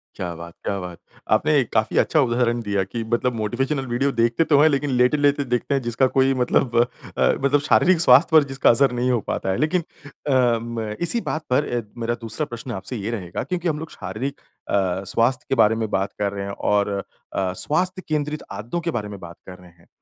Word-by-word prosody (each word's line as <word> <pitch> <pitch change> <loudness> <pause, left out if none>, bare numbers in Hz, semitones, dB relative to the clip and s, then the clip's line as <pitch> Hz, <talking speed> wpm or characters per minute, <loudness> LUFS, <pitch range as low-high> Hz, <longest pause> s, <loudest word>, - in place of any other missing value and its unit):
क्या 90 -2 -4
बात, 85 +1 -9
क्या 100 - -2
बात! 90 -2 -7 0.3
आपने 145 -3 +3
काफ़ी 110 - +1
अच्छा 155 - +3
उदाहरण 120 -2 +1
दिया 100 -3 0
कि 115 +5 -5
मतलब 120 +2 +1
मोटिवेशनल 135 +6 -1
वीडियो 130 +4 0
देखते 115 +4 +2
तो 145 -3 +3
हैं 155 - +6
लेकिन 145 0 0
लेटे-लेटे 140 +3 +2
देखते 125 +2 -1
हैं 135 - 0
जिसका 120 +2 +1
कोई 135 0 +4
मतलब 125 -1 +1 0.4
अ, - - +3
मतलब 140 +1 +3
शारीरिक 160 +4 +3
स्वास्थ्य 140 +2 +6
पर 150 - +6
जिसका 135 0 +2
असर 135 +3 +4
नहीं 125 +1 0
हो 120 - +2
पाता - - -2
है। 95 - 0
लेकिन 170 +3 +1 0.2
अ, 130 -5 +1
म 115 -2 -4
इसी 200 +7 +1
बात 155 0 -4
पर 130 +4 +2
अ, - - -1 0.2
मेरा 115 +1 -1
दूसरा 115 +6 -3
प्रश्न 120 -1 -7
आपसे 95 +4 -5
ये 105 +2 -4
रहेगा, 95 -6 -4
क्योंकि 180 -1 -3
हम 155 -2 -1
लोग 160 +1 -8
शारीरिक 140 +2 -5 0.3
अ, 95 -1 0
स्वास्थ्य 125 +2 +1
के - - +2
बारे 110 -2 +4
में 110 -1 -2
बात 95 +1 -1
कर 100 -1 0
रहे 100 -1 -4
हैं 100 - -5 0.2
और 105 0 +2 0.4
अ, 95 -1 -1
स्वास्थ्य 185 - -1
केंद्रित 150 -1 -2
आदतों 120 +11 -4
के 170 - -2
बारे 110 -7 -3
में 100 - -8
बात 85 -2 -10
कर 90 -1 -9
रहे 90 - -15
हैं। 85 0 -26
120 Hz, 215 wpm, -22 LUFS, 105-145 Hz, 0.4 s, हैं